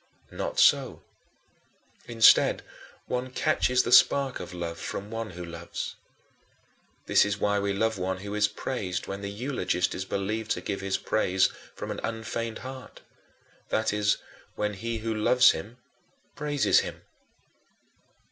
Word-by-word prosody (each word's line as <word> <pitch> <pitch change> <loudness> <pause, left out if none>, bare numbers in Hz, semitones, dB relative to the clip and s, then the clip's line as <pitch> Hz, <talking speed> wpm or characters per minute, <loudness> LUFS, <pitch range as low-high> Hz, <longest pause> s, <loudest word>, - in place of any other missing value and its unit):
Not - - -3
so. - - +4 1.0
Instead, 115 -1 +5 0.4
one 125 +1 -3
catches 125 0 +2
the - - -3
spark 130 +1 +5
of 90 -1 -7
love 85 -2 -5
from 100 +2 -5
one 115 -1 -4
who 90 - -5
loves. 85 0 -6 1.1
This - - +5
is 100 0 -1
why 100 0 +1
we 100 0 -1
love 110 +1 0
one 95 +1 -1
who 100 +1 -6
is 105 0 +3
praised 95 -7 -4
when 100 0 -6
the 100 - -4
eulogist 100 -5 -1
is 95 - -3
believed 105 +3 -3
to - - -5
give 100 -1 -4
his 95 -1 -1
praise 95 -3 +2 0.3
from - - -5
an - - -4
unfeigned 115 0 -3
heart; 130 0 -9 0.7
that 110 -1 +1
is, 105 -1 +2 0.4
when 105 0 -1
he 115 +3 -4
who 110 +1 -2
loves 125 +4 +5
him 105 +9 -7 0.6
praises 145 -1 +2
him. - - -6
105 Hz, 145 wpm, -27 LUFS, 100-115 Hz, 1.1 s, Instead